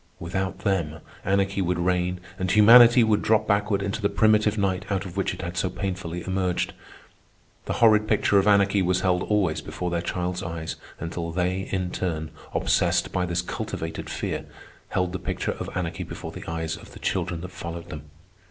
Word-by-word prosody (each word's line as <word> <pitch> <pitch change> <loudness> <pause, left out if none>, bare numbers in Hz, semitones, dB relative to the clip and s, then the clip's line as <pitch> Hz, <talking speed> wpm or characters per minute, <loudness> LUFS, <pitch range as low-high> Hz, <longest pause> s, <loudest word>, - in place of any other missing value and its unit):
Without 95 +2 -3
them, 85 -6 -1 0.2
anarchy 100 +1 +1
would 90 -1 0
reign 90 0 0 0.2
and 95 0 -1
humanity 120 +4 +8
would 110 -2 +2
drop 110 0 +3
backward 100 -1 +1
into 100 +2 -3
the 100 - +2
primitive 110 0 +3
night 95 -2 0
out 100 -1 -1
of 90 - -8
which - - 0
it - - -7
had 85 +1 -5
so 95 0 0
painfully 90 -3 -4
emerged. 95 -1 -1 0.9
The - - -2
horrid 110 -2 +4
picture 105 -2 +3
of 95 - +1
anarchy 100 -1 +4
was 90 0 +1
held 90 -1 +2
always 90 -7 +1
before 90 +3 -4
their 85 -1 0
child's 90 +1 -2
eyes 80 -1 -4 0.2
until 85 +1 -4
they, 90 +2 -1
in 95 -2 -1
turn, 80 -4 -3 0.2
obsessed - - +2
by 90 -1 0
this 85 0 -1
cultivated 80 -2 -5
fear, - - -3 0.4
held 90 -1 0
the 95 - -3
picture 90 - -2
of - - -4
anarchy 85 -2 -3
before - - -6
the - - -9
eyes 80 -1 -2
of - - -14
the - - -11
children 85 -2 -2
that 90 +1 -7
followed 85 -1 -7
them. 75 -3 -8
90 Hz, 185 wpm, -25 LUFS, 85-100 Hz, 0.9 s, humanity